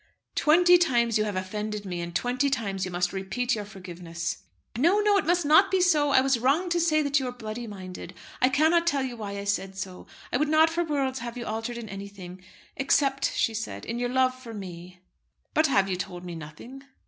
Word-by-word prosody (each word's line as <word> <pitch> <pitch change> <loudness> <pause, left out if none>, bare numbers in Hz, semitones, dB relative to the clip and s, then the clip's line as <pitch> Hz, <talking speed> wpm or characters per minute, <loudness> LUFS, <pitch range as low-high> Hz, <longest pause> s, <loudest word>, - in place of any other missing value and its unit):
"Twenty 355 +3 +5
times 235 -9 +2
you 215 - +1
have 205 -2 -3
offended 210 +2 -4
me, 180 -2 -4
and 170 0 -6
twenty 250 +3 +1
times 200 -8 -2
you - - -4
must 175 0 -1
repeat 230 +6 -1
your 210 -2 -3
forgiveness." 180 -4 -6 0.4
"No, 335 - +3
no, 415 -1 +3
it 380 - -1
must 350 -1 +2
not 320 +7 +6
be 380 - +2
so. 310 -5 +3
I 265 -2 +5
was 265 -2 +2
wrong 285 +9 +2
to 345 0 +1
say 310 -2 +3
that 285 0 +2
you 260 - -3
were - - -3
bloody 235 0 -6
minded. 185 -3 -8 0.3
I 255 - +5
cannot 320 +5 +3
tell 275 -5 +1
why 205 -3 -6
I 200 - -4
said 195 -1 -2
so. 185 -1 -7 0.3
I - - +3
would 300 +2 0
not 315 +1 +5
for 345 +1 0
worlds 275 -5 -1
have 235 0 -6
you 240 - -5
altered 225 +2 -4
in 235 -2 -7
anything; 195 -2 -9 0.3
except," 275 0 +1
she 225 - +1
said, 220 0 -5
"in 230 +1 -4
your 245 0 -1
love 255 0 +2
for 250 -3 -10
me." 180 -2 -9 0.5
"But 310 0 +4
have 200 -8 +3
you 185 -2 -2
told 180 0 -6
me 175 - -6
nothing?" 165 - -10
235 Hz, 220 wpm, -27 LUFS, 195-285 Hz, 0.5 s, not